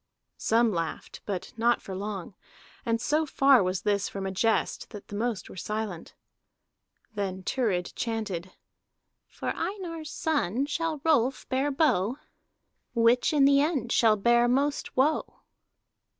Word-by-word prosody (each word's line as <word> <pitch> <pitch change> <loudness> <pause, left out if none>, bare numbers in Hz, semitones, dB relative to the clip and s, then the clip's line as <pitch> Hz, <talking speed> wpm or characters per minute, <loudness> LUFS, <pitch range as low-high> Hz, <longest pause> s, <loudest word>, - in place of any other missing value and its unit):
Some 230 0 +3
laughed, 165 -2 -4
but 190 -2 -4
not 235 +1 +3
for 195 - -8
long, 195 -1 -5 0.5
and 230 0 +1
so 300 +6 +1
far 275 -2 +5
was 185 0 -1
this 200 -1 +1
from 195 -1 -5
a 190 - -2
jest 220 +4 0
that 205 - -11
the 205 - -6
most 220 -2 -2
were - - -11
silent. 210 -2 -5 1.0
Then 190 -3 -3
Thurid 190 -7 -1
chanted: 205 -6 -3 0.8
"For - - -5
Einar's 335 -6 -4
son 280 - 0
shall 315 0 -2
Rolf 270 -5 +2
bear 270 +2 +1
bow. 260 - +1 0.8
Which 235 +2 +4
in 290 -3 +4
the 280 0 +5
end 285 -7 0
shall 220 -2 +4
bear 235 +3 +4
most 280 +3 0
woe?" 295 +4 +1
230 Hz, 135 wpm, -28 LUFS, 200-275 Hz, 1.0 s, far